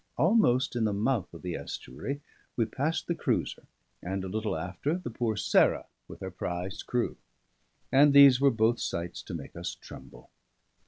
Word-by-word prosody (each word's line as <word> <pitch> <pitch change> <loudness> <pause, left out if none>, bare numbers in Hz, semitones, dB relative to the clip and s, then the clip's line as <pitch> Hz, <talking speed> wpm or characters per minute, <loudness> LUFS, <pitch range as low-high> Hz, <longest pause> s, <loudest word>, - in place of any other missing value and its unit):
Almost 155 - +3
in 115 -2 +1
the 105 - +1
mouth 110 -1 0
of 85 - -12
the 90 -1 -3
estuary, 140 - -6 0.3
we 115 - +2
passed 145 +8 -2
the 170 - -1
cruiser, - - -2 0.3
and 95 +2 -3
a - - -4
little 105 -3 -2
after 90 - -2
the 180 -10 -6
poor 115 -1 -1
Sarah - - +3 0.2
with - - -11
her 95 0 -5
prize 90 +1 -4
crew; 125 -1 -2 0.7
and 145 +2 +6
these 140 -2 +8
were 140 - +6
both 115 0 +2
sights 85 +2 -4
to 95 - -7
make 70 -5 -8
us 85 +1 -5
tremble. - - -13
110 Hz, 170 wpm, -29 LUFS, 95-135 Hz, 0.7 s, these